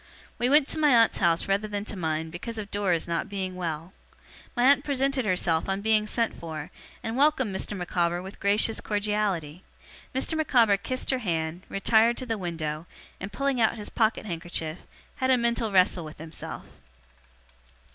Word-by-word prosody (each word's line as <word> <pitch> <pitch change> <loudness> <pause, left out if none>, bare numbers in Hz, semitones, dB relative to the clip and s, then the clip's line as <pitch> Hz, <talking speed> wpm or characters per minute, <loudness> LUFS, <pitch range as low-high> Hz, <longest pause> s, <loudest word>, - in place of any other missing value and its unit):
We 245 - +2
went 290 0 +5
to 315 - -1
my 295 -5 +5
aunt's 230 -1 +4
house 170 -3 +2
rather 200 +2 +1
than 205 -1 -4
to - - -5
mine, 160 -2 -2
because 225 +7 -6
of 210 -1 -6
Dora's 190 -5 0
not 170 0 -2
being 190 -2 -4
well. 165 0 -4 0.6
My 245 - +1
aunt 275 +2 +5
presented 275 -3 0
herself 180 -3 +1
on 195 +1 -1
being 215 0 +2
sent 230 +1 0
for, 155 -2 -7 0.3
and 225 - -3
welcomed 265 -7 +2
Mr. 205 +1 -3
Micawber 175 -1 0
with 190 +2 -9
gracious 210 +2 +2
cordiality. 205 -6 -1 0.5
Mr. 265 +5 0
Micawber 240 -10 +4
kissed 255 +7 -2
her 260 - 0
hand, 165 -5 -2
retired 225 +4 +3
to 255 - -3
the 225 -3 -2
window, 160 -3 -4 0.3
and 195 +2 -6
pulling 270 +3 0
out 220 - +3
his 210 - -5
pocket 220 -1 +1
handkerchief, 165 -2 -4 0.4
had 260 - 0
a 260 - +5
mental 235 -2 0
wrestle 185 -2 +3
with 155 0 -9
himself. 160 +1 -7
205 Hz, 175 wpm, -27 LUFS, 175-235 Hz, 0.6 s, went